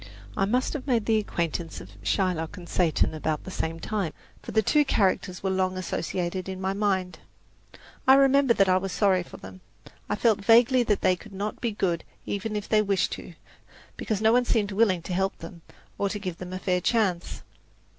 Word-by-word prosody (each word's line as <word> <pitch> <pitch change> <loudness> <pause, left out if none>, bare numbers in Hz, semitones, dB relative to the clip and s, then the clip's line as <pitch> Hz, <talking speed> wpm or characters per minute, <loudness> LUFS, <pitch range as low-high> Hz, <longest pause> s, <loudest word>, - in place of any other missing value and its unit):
I - - +2
must 250 +5 0
have 290 -2 -6
made 235 -5 +1
the 220 -1 +3
acquaintance 170 -4 -3
of 95 - -12
Shylock 160 - -1
and 175 -1 -10
Satan 170 -4 +1
about 155 -1 -2
the 190 - -8
same 165 -2 -3
time, 200 -3 -2 0.3
for - - -8
the 220 - +2
two 300 +8 +4
characters 195 -7 0
were 190 - 0
long 185 0 0
associated 185 0 -3
in 190 -1 -5
my 190 +1 -1
mind. 190 -3 -1 0.9
I 265 - +9
remember 275 -2 +4
that 195 - +4
I 185 0 +4
was 190 0 -3
sorry 190 -2 +2
for 175 - -11
them. 95 0 -12 0.5
I 205 - +1
felt 215 -2 +2
vaguely 240 +4 +5
that 215 -4 +1
they 185 - +3
could 200 +3 -14
not 205 +2 -4
be 235 - 0
good 180 -5 -1 0.2
even 210 +2 -3
if 210 -1 -3
they 215 -1 +3
wished 200 -2 0
to, - - -8 0.6
because 215 -3 -2
no 220 +1 +5
one 245 0 +3
seemed 210 -4 +1
willing 195 -4 +2
to 180 - -5
help 190 +2 0
them 165 +1 -10 0.4
or 200 - +1
to 205 - -3
give 185 -4 -5
them 180 0 -7
a - - -3
fair 180 -1 0
chance. 195 -5 0
195 Hz, 205 wpm, -26 LUFS, 180-215 Hz, 0.9 s, I